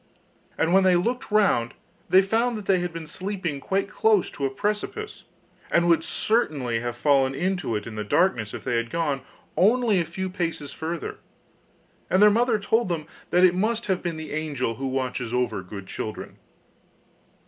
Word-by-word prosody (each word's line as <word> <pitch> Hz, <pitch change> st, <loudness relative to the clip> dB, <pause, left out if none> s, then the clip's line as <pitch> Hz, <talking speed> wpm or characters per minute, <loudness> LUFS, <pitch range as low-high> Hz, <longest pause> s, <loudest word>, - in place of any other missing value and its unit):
And 165 Hz, +2 st, +1 dB
when 195 Hz, 0 st, +6 dB
they 185 Hz, -1 st, +5 dB
looked 240 Hz, +9 st, -1 dB
round 200 Hz, -, +2 dB, 0.3 s
they 190 Hz, +1 st, +6 dB
found 230 Hz, +4 st, +1 dB
that 210 Hz, -, -7 dB
they 190 Hz, -2 st, +3 dB
had 175 Hz, -1 st, -2 dB
been 165 Hz, -1 st, -7 dB
sleeping 185 Hz, -3 st, -4 dB
quite 195 Hz, +7 st, -1 dB
close 210 Hz, -2 st, +2 dB
to 140 Hz, -, -1 dB
a -, -, -3 dB
precipice, 210 Hz, -, -3 dB, 0.4 s
and 170 Hz, 0 st, +3 dB
would 165 Hz, -1 st, +4 dB
certainly 145 Hz, -, 0 dB
have 120 Hz, 0 st, -4 dB
fallen 135 Hz, -1 st, +3 dB
into 180 Hz, -, -1 dB
it 105 Hz, -, -3 dB
in 115 Hz, -, -7 dB
the 105 Hz, 0 st, -3 dB
darkness 115 Hz, -, +1 dB
if -, -, -7 dB
they 120 Hz, -, 0 dB
had 115 Hz, 0 st, -2 dB
gone 150 Hz, -5 st, -1 dB, 0.3 s
only 215 Hz, +3 st, +3 dB
a -, -, -2 dB
few 190 Hz, +4 st, -4 dB
paces 170 Hz, -5 st, -3 dB
further. 165 Hz, +1 st, -5 dB, 0.9 s
And 185 Hz, -, +3 dB
their 210 Hz, +1 st, +7 dB
mother 235 Hz, +1 st, +3 dB
told 220 Hz, +1 st, +1 dB
them 165 Hz, -3 st, -2 dB, 0.2 s
that 180 Hz, +2 st, +3 dB
it 180 Hz, -, +5 dB
must 220 Hz, +5 st, 0 dB
have 190 Hz, -2 st, 0 dB
been 170 Hz, -2 st, -3 dB
the 160 Hz, -1 st, -7 dB
angel 150 Hz, -6 st, -2 dB
who 135 Hz, -, -3 dB
watches 125 Hz, -2 st, -2 dB
over 120 Hz, -5 st, 0 dB
good 95 Hz, +1 st, -9 dB
children. 110 Hz, +3 st, -6 dB
170 Hz, 180 wpm, -25 LUFS, 135-200 Hz, 0.9 s, their